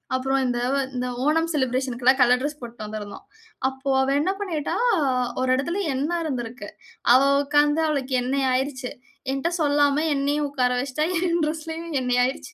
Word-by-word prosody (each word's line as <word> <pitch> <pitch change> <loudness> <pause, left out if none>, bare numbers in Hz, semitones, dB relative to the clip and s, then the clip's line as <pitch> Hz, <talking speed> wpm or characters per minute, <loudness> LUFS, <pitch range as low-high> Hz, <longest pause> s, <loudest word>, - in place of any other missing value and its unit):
அப்புறம் 270 +1 0
இந்த 245 -1 -1 0.4
இந்த 250 0 -2 0.2
ஓணம் 325 +2 +2
செலிபிரேஷன்க்கு 260 -2 -1
எல்லாம் 260 +2 +5
கலர் 250 0 +5
டிரெஸ் 295 +2 -3
போட்டுட்டு 235 -2 -8
வந்திருந்தோம், 210 -2 -7 0.4
அப்போ 265 +1 -6
அவ 265 - +1
என்ன 370 - +1
பண்ணிட்டா, 325 -7 -2 0.7
"ஒரு 260 - 0
இடத்துல 340 +9 -2 0.2
எண்ண 285 +5 -1
இருந்துருக்கு, 240 -6 -5 0.4
அவ 255 - +7 0.2
உட்கார்ந்து 295 +2 +2
அவளுக்கு 275 -4 -1
எண்ணைய் 265 +1 0
ஆயிடுச்சு," 260 -1 -2 0.4
என்ட்ட 275 +5 -1
சொல்லாமல 290 0 +2
என்னையும் 290 +1 0
உட்கார 255 -3 +1
வைச்சிட்டா, 275 +3 -1
என் 345 -1 +1
டிரெஸ்லயும் 320 +2 -5
எண்ணெய் 250 -1 +2
ஆயிடுச்சு. 265 +8 -5
275 Hz, 155 wpm, -24 LUFS, 255-300 Hz, 0.7 s, அவ